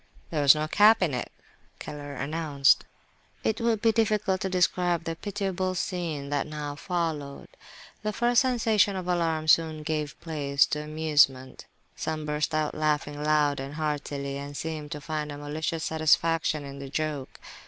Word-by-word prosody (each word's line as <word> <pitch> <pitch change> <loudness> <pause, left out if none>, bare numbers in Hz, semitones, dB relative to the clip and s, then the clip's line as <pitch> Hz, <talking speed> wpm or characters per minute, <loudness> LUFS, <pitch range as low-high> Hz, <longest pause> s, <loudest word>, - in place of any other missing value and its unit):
"There 155 -3 0
was 140 +1 +8
no 155 0 -1
cap 210 +4 +5
in 160 -6 0
it," 125 - -3 0.5
Keller 145 -1 -7
announced. 140 0 +2 0.6
It 220 +1 0
would 230 -2 +1
be 225 - +5
difficult 215 -4 +1
to 190 - -1
describe 180 -2 +1
the 165 -1 -3
pitiable 190 -1 -2
scene 165 -6 -3
that 145 0 0
now 150 -1 -5
followed. 155 -3 -3 0.5
The 215 - -1
first 240 +2 +3
sensation 225 -6 +2
of 185 -1 -4
alarm 165 -3 0
soon 155 -1 +3
gave 150 -2 -3
place 140 -4 +1
to 150 - -1
amusement; 150 -4 +1 0.3
some 155 -1 -3
burst 150 +1 -1
out 155 -1 0
laughing 150 -1 -1
loud 150 -2 +2
and 135 +2 -6
heartily, 145 -2 -3
and 140 0 -7
seemed 155 -2 -5
to 150 - -7
find 150 0 -3
a 145 - -7
malicious 155 +2 -3
satisfaction 160 -1 +2
in 140 0 -8
the 140 -1 -7
joke. 150 -2 -3
155 Hz, 160 wpm, -27 LUFS, 145-175 Hz, 0.6 s, was